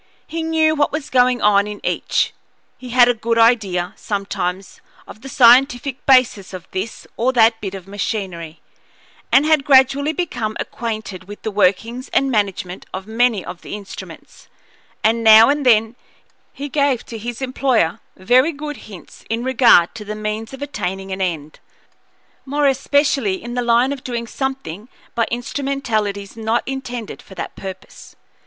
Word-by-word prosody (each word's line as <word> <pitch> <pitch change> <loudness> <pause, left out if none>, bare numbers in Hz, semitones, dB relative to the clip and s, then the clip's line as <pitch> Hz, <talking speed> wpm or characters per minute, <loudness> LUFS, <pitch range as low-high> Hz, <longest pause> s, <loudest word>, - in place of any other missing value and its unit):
He 330 +1 -4
knew 320 -1 +2
what 290 -1 +1
was 300 -1 -5
going 250 -1 +3
on 205 -1 +4
in 210 0 -7
each; - - 0 0.5
he 250 - -9
had 245 0 +6
a 245 - +3
good 230 0 -2
idea, 205 -6 +2
sometimes, 195 -3 -4 0.3
of 215 - -12
the 270 - -9
scientific 250 +1 +4
basis 255 -8 +3
of 180 -1 -9
this 195 +5 -5
or 245 +3 +2
that 225 -2 +4
bit 195 -1 -5
of 190 -1 -10
machinery, 190 -5 -5 0.7
and 275 +2 +5
had 310 -2 +3
gradually 275 +2 +4
become 245 -10 -3
acquainted 215 -5 -5
with 205 0 -10
the 220 - -2
workings 215 +5 0
and 275 0 +2
management 195 -4 -2
of 190 0 -6
many 225 -2 +1
of 180 - -8
the - - -7
instruments; 200 -2 -11 0.6
and 230 +1 +2
now 220 +1 +8
and 285 -2 0
then 225 0 +4 0.6
he 285 - -6
gave 280 -4 0
to 225 - -8
his 240 +2 -6
employer 255 -8 0 0.2
very 250 - +3
good 295 -1 -7
hints 190 -4 -13
in 225 +2 -2
regard 245 -9 +5
to 220 - -8
the 210 +1 -6
means 215 +1 -4
of 270 +1 -7
attaining 195 -8 -4
an 190 0 -4
end, 160 -5 -3 0.8
more 290 +2 -1
especially 275 -5 +2
in 240 +1 -6
the 245 - -1
line 240 +3 +2
of 270 - -9
doing 235 -2 -4
something 245 - -5 0.2
by 230 -2 0
instrumentalities 235 -6 -3
not 225 +1 -1
intended 250 -4 -6
for 190 - -15
that - - -6
purpose. 190 -1 -10
230 Hz, 160 wpm, -19 LUFS, 205-265 Hz, 0.8 s, now